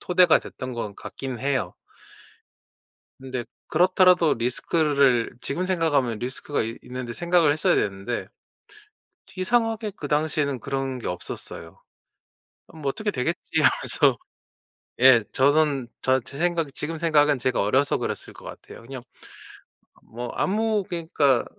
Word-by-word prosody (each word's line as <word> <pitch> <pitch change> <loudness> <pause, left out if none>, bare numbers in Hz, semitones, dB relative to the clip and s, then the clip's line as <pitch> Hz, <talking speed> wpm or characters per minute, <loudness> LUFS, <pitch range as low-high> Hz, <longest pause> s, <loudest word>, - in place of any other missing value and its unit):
토대가 180 -2 +4
됐던 130 -1 -8
것 105 -4 -5
같긴 130 +3 -7
해요. 135 +1 -1 1.5
근데 130 -2 -5 0.2
그렇더라도 180 -1 +4
리스크를 135 0 +1
지금 175 +9 -3
생각하면 145 - +1
리스크가 130 +5 -3
이 115 +1 -5
있는데 125 -1 -6
생각을 170 +1 +3
했어야 155 - +2
됐는데 100 +4 -2 1.1
이상하게 225 +2 0
그 145 - -6
당시에는 150 -3 0
그런 135 0 -3
게 - - -6
없었어요. 85 -2 -8 0.9
'뭐 160 - -13
어떻게 210 +10 -2
되겠지.' 125 -9 -2 0.2
하면서 - - +3 0.8
예. 125 -3 +7
저는 140 -1 +2
저 130 0 +2
제 135 +4 -11
생각은 170 -3 0
지금 160 +2 -4
생각은 150 -3 +3
제가 125 +1 0
어려서 130 +8 +2
그랬을 - - -5
것 - - -15
같아요. - - -11
그냥 130 +1 -8 1.0
뭐 120 +1 -7
아무 215 +1 +1
그러니까 160 -7 +1
140 Hz, 290 characters per minute, -24 LUFS, 125-165 Hz, 1.5 s, 예